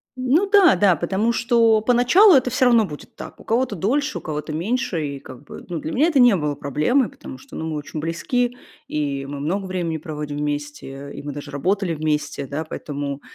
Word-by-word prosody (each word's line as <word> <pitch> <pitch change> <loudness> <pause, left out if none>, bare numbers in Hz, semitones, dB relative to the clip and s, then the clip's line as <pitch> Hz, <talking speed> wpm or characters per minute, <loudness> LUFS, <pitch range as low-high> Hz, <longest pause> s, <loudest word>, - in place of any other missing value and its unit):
Ну 275 +10 +1
да, 395 -5 +6
да, 195 -4 +4
потому 195 +6 0
что 230 -2 +3
поначалу 250 - +5
это 255 -3 +4
всё 260 +2 +2
равно 235 -3 +5
будет 150 -4 -10
так. - - -10
У - - -13
кого-то 230 -1 0
дольше, 280 - 0
у - - -6
кого-то 150 -1 -5
меньше. 170 - -1
И 140 -1 -6
как 130 0 -12
бы, - - -11
ну, 175 - -3
для 160 - -5
меня 295 +6 +3
это 310 -5 +2
не 245 -5 +6
было 150 -3 -1
проблемой, 155 - +1
потому 275 -1 -11
что, 275 - -14
ну, 160 - -4
мы 155 - -3
очень 150 +1 -6
близки, 245 +10 -1 0.3
и 140 -2 -2
мы 145 0 -6
много 185 +7 -2
времени 175 -3 -2
проводим 150 -2 -6
вместе, 145 -1 -5
и - - -7
мы 145 0 -6
даже 145 +1 -8
работали 180 +5 0
вместе, 150 -2 -2
да, 150 +4 -3
поэтому, 145 -2 -5
170 Hz, 205 wpm, -22 LUFS, 150-245 Hz, 0.3 s, да